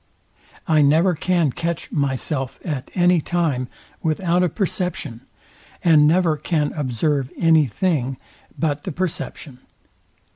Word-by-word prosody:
I 155 Hz, -2 st, +4 dB
never 160 Hz, +6 st, +4 dB
can 170 Hz, -2 st, +1 dB
catch 170 Hz, +3 st, -4 dB
myself 135 Hz, -1 st, -2 dB
at 145 Hz, -7 st, -4 dB
any 175 Hz, -2 st, +4 dB
time 150 Hz, -7 st, -1 dB, 0.3 s
without 170 Hz, +2 st, +1 dB
a 180 Hz, -, +2 dB
perception, 180 Hz, -, -3 dB, 0.6 s
and 155 Hz, -3 st, +6 dB
never 165 Hz, -1 st, +3 dB
can 150 Hz, -1 st, -1 dB
observe 140 Hz, 0 st, -1 dB
any 160 Hz, -3 st, +4 dB
thing 135 Hz, -, -1 dB, 0.4 s
but 145 Hz, -2 st, -1 dB
the 185 Hz, -, -4 dB
perception. 155 Hz, -5 st, -4 dB
155 Hz, 115 wpm, -21 LUFS, 140-175 Hz, 0.6 s, and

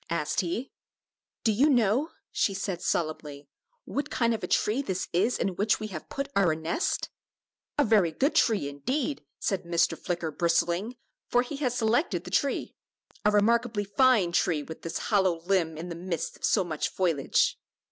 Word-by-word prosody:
asked 160 Hz, -3 st, -1 dB
he. 190 Hz, +9 st, -2 dB, 0.7 s
"Do 225 Hz, -, +3 dB
you 260 Hz, +9 st, +4 dB
know," 245 Hz, +3 st, +3 dB, 0.2 s
she 195 Hz, -, +1 dB
said, 190 Hz, -2 st, -3 dB
solemnly, 150 Hz, -4 st, -2 dB, 0.4 s
"what 285 Hz, -, -3 dB
kind 235 Hz, -1 st, +1 dB
of 225 Hz, -, -4 dB
a -, -, -2 dB
tree 225 Hz, +6 st, +1 dB
this 190 Hz, -8 st, -3 dB
is 205 Hz, +8 st, +2 dB
in -, -, 0 dB
which 210 Hz, +2 st, +2 dB
we 215 Hz, -, -4 dB
have 165 Hz, -6 st, -8 dB
put 275 Hz, -1 st, -3 dB
our 180 Hz, -6 st, +3 dB
nest?" 160 Hz, -, -1 dB, 0.7 s
"A 290 Hz, -, +5 dB
very 205 Hz, -7 st, +4 dB
good 275 Hz, -, +1 dB
tree, 215 Hz, -11 st, +2 dB
indeed," 255 Hz, -, -2 dB
said 195 Hz, -3 st, -1 dB
Mr. 170 Hz, -1 st, +1 dB
Flicker, 175 Hz, -3 st, -3 dB
bristling, 175 Hz, +7 st, 0 dB, 0.3 s
for 245 Hz, 0 st, +3 dB
he 275 Hz, +3 st, -6 dB
had 270 Hz, -4 st, 0 dB
selected 240 Hz, +6 st, +1 dB
the -, -, -9 dB
tree; 280 Hz, -2 st, 0 dB, 0.5 s
"a 210 Hz, -, +5 dB
remarkably 220 Hz, +1 st, +2 dB
fine 205 Hz, -2 st, +3 dB
tree, 165 Hz, -3 st, +1 dB
with 160 Hz, +2 st, -9 dB
this 165 Hz, -, -4 dB
hollow 190 Hz, -6 st, +1 dB
limb 170 Hz, -3 st, 0 dB
in 170 Hz, +3 st, -6 dB
the 170 Hz, -, -5 dB
midst 175 Hz, 0 st, -4 dB
of -, -, -3 dB
so 200 Hz, -, +3 dB
much 160 Hz, -4 st, -2 dB
foliage." 165 Hz, -7 st, +1 dB
195 Hz, 175 wpm, -28 LUFS, 170-235 Hz, 0.7 s, A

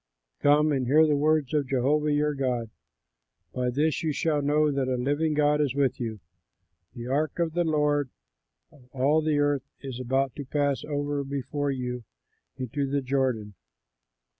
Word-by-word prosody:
Come 150 Hz, +1 st, +4 dB
and 130 Hz, -3 st, 0 dB
hear 155 Hz, +4 st, +6 dB
the 150 Hz, -1 st, +2 dB
words 150 Hz, -1 st, +1 dB
of 145 Hz, -3 st, +1 dB
Jehovah 145 Hz, +3 st, +1 dB
your 150 Hz, 0 st, +1 dB
God. 125 Hz, -5 st, -2 dB, 0.8 s
By 125 Hz, -1 st, -1 dB
this 150 Hz, +4 st, 0 dB
you 160 Hz, -, 0 dB
shall 150 Hz, 0 st, 0 dB
know 150 Hz, +1 st, +2 dB
that 135 Hz, -2 st, -1 dB
a 130 Hz, -, 0 dB
living 145 Hz, +5 st, 0 dB
God 150 Hz, 0 st, +3 dB
is 140 Hz, -3 st, 0 dB
with 140 Hz, -2 st, +1 dB
you: 110 Hz, -3 st, -4 dB, 0.8 s
the 120 Hz, -, -6 dB
ark 140 Hz, +4 st, -1 dB
of 170 Hz, -2 st, 0 dB
the 175 Hz, +1 st, +1 dB
Lord 150 Hz, -3 st, +1 dB, 0.6 s
of 130 Hz, -4 st, -21 dB
all 140 Hz, +4 st, +2 dB
the 155 Hz, -1 st, +1 dB
earth 145 Hz, -2 st, 0 dB
is 130 Hz, -3 st, -6 dB
about 130 Hz, 0 st, 0 dB
to 145 Hz, -, -4 dB
pass 140 Hz, 0 st, 0 dB
over 145 Hz, -1 st, -2 dB
before 140 Hz, +1 st, -3 dB
you 125 Hz, -2 st, -3 dB, 0.5 s
into 135 Hz, +2 st, -2 dB
the 140 Hz, 0 st, 0 dB
Jordan. 125 Hz, -6 st, -1 dB
145 Hz, 165 wpm, -27 LUFS, 130-150 Hz, 0.8 s, hear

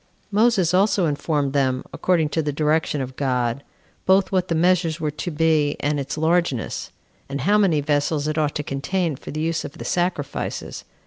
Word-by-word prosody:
Moses 205 Hz, -5 st, +3 dB
also 195 Hz, 0 st, +3 dB
informed 145 Hz, -2 st, -1 dB
them, 130 Hz, -2 st, +1 dB
according 165 Hz, -4 st, +1 dB
to 160 Hz, -, 0 dB
the 150 Hz, -1 st, -1 dB
direction 150 Hz, 0 st, 0 dB
of 130 Hz, 0 st, -6 dB
God, 125 Hz, -1 st, -1 dB, 0.4 s
both 190 Hz, +1 st, +4 dB
what 185 Hz, -1 st, +1 dB
the 165 Hz, -, 0 dB
measures 170 Hz, -1 st, +2 dB
were 155 Hz, -2 st, -1 dB
to 150 Hz, +4 st, -5 dB
be, 155 Hz, -2 st, +2 dB
and 145 Hz, 0 st, 0 dB
its 140 Hz, +2 st, -4 dB
largeness; 160 Hz, -6 st, 0 dB, 0.4 s
and 140 Hz, 0 st, -3 dB
how 205 Hz, +8 st, +3 dB
many 170 Hz, -8 st, +3 dB
vessels 145 Hz, +1 st, 0 dB
it 155 Hz, -, -1 dB
ought 150 Hz, -2 st, 0 dB
to 150 Hz, -, -2 dB
contain 160 Hz, +4 st, -1 dB
for -, -, -11 dB
the 155 Hz, -, -3 dB
use 165 Hz, +1 st, -1 dB
of -, -, -7 dB
the -, -, -7 dB
sacrifices. 175 Hz, -5 st, -2 dB
155 Hz, 185 wpm, -22 LUFS, 145-175 Hz, 0.4 s, both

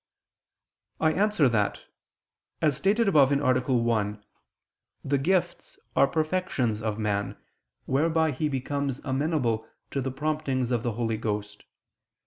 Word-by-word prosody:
I 160 Hz, -, +3 dB
answer 200 Hz, -5 st, +3 dB
that, 110 Hz, -4 st, 0 dB, 0.7 s
As 150 Hz, -4 st, +2 dB
stated 210 Hz, -, +2 dB
above 145 Hz, -7 st, +5 dB
(A. 130 Hz, -3 st, +2 dB
1), 110 Hz, -3 st, 0 dB, 0.8 s
the 140 Hz, +1 st, +2 dB
gifts 175 Hz, +4 st, -1 dB, 0.2 s
are 140 Hz, -, +5 dB
perfections 155 Hz, -, -1 dB
of 110 Hz, -1 st, -2 dB
man, 100 Hz, -2 st, -2 dB, 0.5 s
whereby 160 Hz, +3 st, +2 dB
he 150 Hz, +3 st, -1 dB
becomes 140 Hz, 0 st, -2 dB
amenable 130 Hz, -5 st, 0 dB, 0.2 s
to 140 Hz, -, -1 dB
the 135 Hz, -, -2 dB
promptings 135 Hz, -3 st, -1 dB
of 120 Hz, -2 st, +1 dB
the 120 Hz, -1 st, -2 dB
Holy 115 Hz, 0 st, -1 dB
Ghost. 105 Hz, -1 st, -4 dB
135 Hz, 120 wpm, -27 LUFS, 115-155 Hz, 0.8 s, above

